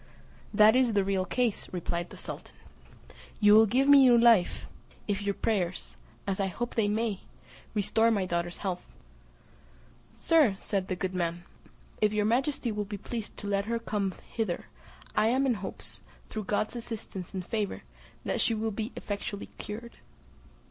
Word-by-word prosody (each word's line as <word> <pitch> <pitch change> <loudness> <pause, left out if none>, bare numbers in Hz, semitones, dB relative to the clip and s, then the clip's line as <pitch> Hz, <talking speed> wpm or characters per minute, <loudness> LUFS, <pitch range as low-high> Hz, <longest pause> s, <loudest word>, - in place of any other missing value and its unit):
"That 215 +2 +6
is 255 -3 +3
the 200 -1 +3
real 190 -1 0
case," 240 0 0
replied 175 -1 -3
the - - -11
sultan. - - -7 0.8
"You 210 -1 +6
will 220 +1 +8
give 260 +6 +2
me 285 0 +9
new 250 -3 +7
life 230 -6 +4 0.4
if 205 -1 -1
your 200 -1 -1
prayers, 185 -5 -1 0.3
as 195 -1 -2
I 195 - +1
hope 240 +6 -4
they 220 -3 +2
may, 210 -1 0 0.6
restore 210 +2 +3
my 205 -4 +1
daughter's 170 -1 -2
health." 180 -2 -3 1.3
"Sir," 295 -12 +4
said 195 -3 -1
the 185 - -1
good 185 0 -3
man, 175 -1 -2 0.6
"if 210 0 +3
your 210 -1 +1
majesty 250 +2 +1
will 210 0 -2
be 205 0 -5
pleased 225 +2 -6
to 205 - -6
let 200 0 0
her 230 +1 -1
come 205 -4 -2
hither, 220 -7 -2 0.5
I 215 - +4
am 260 +4 +2
in 260 - +3
hopes, 200 -3 -5 0.3
through 215 -2 -4
God's 215 +3 -1
assistance 215 -6 -6
and 185 -2 -3
favour, 210 -1 -2 0.4
that - - 0
she 230 - +2
will 220 +1 -1
be 220 +4 -4
effectually 205 0 -5
cured." 235 +3 -7
210 Hz, 165 wpm, -29 LUFS, 195-230 Hz, 1.3 s, me